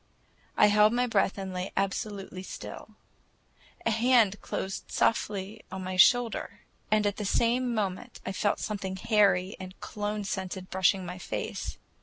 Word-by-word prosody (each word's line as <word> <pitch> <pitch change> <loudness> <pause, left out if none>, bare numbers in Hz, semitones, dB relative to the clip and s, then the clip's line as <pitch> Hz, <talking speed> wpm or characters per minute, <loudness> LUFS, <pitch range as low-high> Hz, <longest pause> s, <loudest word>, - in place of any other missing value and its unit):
I - - +7
held 210 +1 +5
my 245 +1 +2
breath 205 -4 +1
and 190 -1 -5
lay 180 +1 -3
absolutely 195 -1 -2
still. 190 - -9 0.9
A 230 - +3
hand 225 -3 +3
closed 195 +1 -4
softly 210 -1 0
on 190 0 -5
my 185 0 -4
shoulder, 235 +5 +3 0.3
and 215 -1 +3
at 205 -1 0
the 210 - -3
same 240 +4 +2
moment 210 +3 -3
I - - -2
felt 205 +1 0
something 195 -3 -3
hairy 195 -2 +3
and 185 0 -9
cologne 210 0 -3
scented 190 -1 -4
brushing 190 0 +2
my 180 +1 -6
face. - - -4
200 Hz, 150 wpm, -29 LUFS, 190-215 Hz, 0.9 s, I